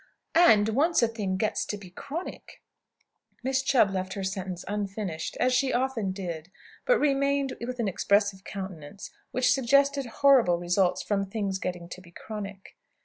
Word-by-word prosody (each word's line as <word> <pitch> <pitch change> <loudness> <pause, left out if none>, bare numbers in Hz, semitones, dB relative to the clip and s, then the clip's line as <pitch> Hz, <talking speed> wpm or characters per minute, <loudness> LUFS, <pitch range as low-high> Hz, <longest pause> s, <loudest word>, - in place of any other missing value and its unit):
And, 220 -12 +6
once 290 +6 +3
a - - +5
thing 205 -5 -3
gets 215 +2 0
to 210 - -4
be 190 -3 -12
chronic 300 - -7 0.4
" - - -43
Miss 265 +1 +1
Chubb 250 -7 +3
left 190 0 -3
her 195 - -4
sentence 190 -2 -4
unfinished, 200 -4 -4
as 250 +1 +3
she 260 +1 +2
often 245 -5 0
did; 175 -4 -6 0.4
but - - +5
remained 280 -1 +1
with 250 +1 -4
an 230 - 0
expressive 200 0 +1
countenance, 190 -4 -8 0.2
which 255 0 +2
suggested 275 +1 +2
horrible 240 -8 +4
results 180 +1 +1
from 200 -1 -1
"things 195 -2 -2
getting 180 -2 -4
to 185 - -8
be 175 - -16
chronic." 200 +1 -8
205 Hz, 160 wpm, -27 LUFS, 190-260 Hz, 0.4 s, And